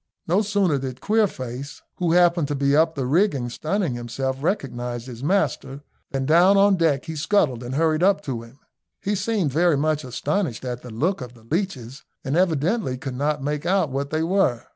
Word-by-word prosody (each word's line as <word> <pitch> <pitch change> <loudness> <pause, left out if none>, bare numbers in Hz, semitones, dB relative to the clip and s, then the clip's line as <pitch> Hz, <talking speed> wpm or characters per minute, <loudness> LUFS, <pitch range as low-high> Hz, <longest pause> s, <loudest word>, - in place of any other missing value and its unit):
No 180 +5 +3
sooner 195 -8 +1
did 130 -1 -5
Queerface, 140 - -2
who 170 -2 +1
happened 175 -3 +4
to 145 - -2
be 140 0 +2
up 160 +1 +3
the 135 -3 -2
rigging 140 - +1
sunning 170 - -1
himself, 130 +3 -3
recognise 125 - -2
his 125 -1 -9
master, 145 -5 -1 0.3
than 135 -1 -2
down 175 +7 +5
on 200 0 +5
deck 160 -6 +1
he 160 -1 -5
scuttled 150 - +1
and 125 +2 -5
hurried 160 +1 +2
up 195 +2 +3
to 125 -4 -4
him. 115 +3 -15 0.4
He 205 - -2
seemed 205 -5 0
very 165 +1 +3
much 155 +1 0
astonished 130 - -2
at 125 -1 -4
the 125 - -10
look 150 - -1
of 125 -1 -8
the 115 - -18
leeches, 135 - -3 0.2
and 135 - -2
evidently 170 - +1
could 130 0 -5
not 145 +2 -1
make 150 +1 -2
out 185 -6 +2
what 140 +1 -2
they 155 +1 -1
were. 165 -10 +1
150 Hz, 190 wpm, -23 LUFS, 130-180 Hz, 0.4 s, down